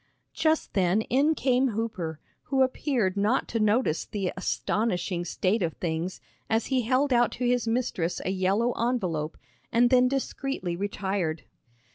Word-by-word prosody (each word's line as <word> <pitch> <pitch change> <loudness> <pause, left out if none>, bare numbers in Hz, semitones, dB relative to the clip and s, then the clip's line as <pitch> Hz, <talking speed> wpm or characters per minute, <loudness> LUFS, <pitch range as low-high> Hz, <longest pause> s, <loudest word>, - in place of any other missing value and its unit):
Just 315 0 +1
then 190 +2 +2
in 285 +7 +2
came 260 -1 +2
Hooper, 180 -9 -3 0.3
who 270 -1 +3
appeared 255 -7 0
not 210 +6 +1
to 230 - -1
notice 215 -5 +2
the 195 -4 -3
astonishing 185 -1 -1
state 190 +5 0
of 165 -3 0
things 170 +2 -3 0.3
as 225 0 +1
he 255 - +3
held 255 +4 +2
out 240 0 +3
to 250 - -3
his 245 -1 +1
mistress 225 -8 -1
a 185 - 0
yellow 195 +5 +1
envelope, 185 -12 -1 0.3
and 240 +2 +4
then 250 -1 +6
discreetly 270 -7 -2
retired. 190 -4 -2
220 Hz, 145 wpm, -27 LUFS, 185-250 Hz, 0.3 s, then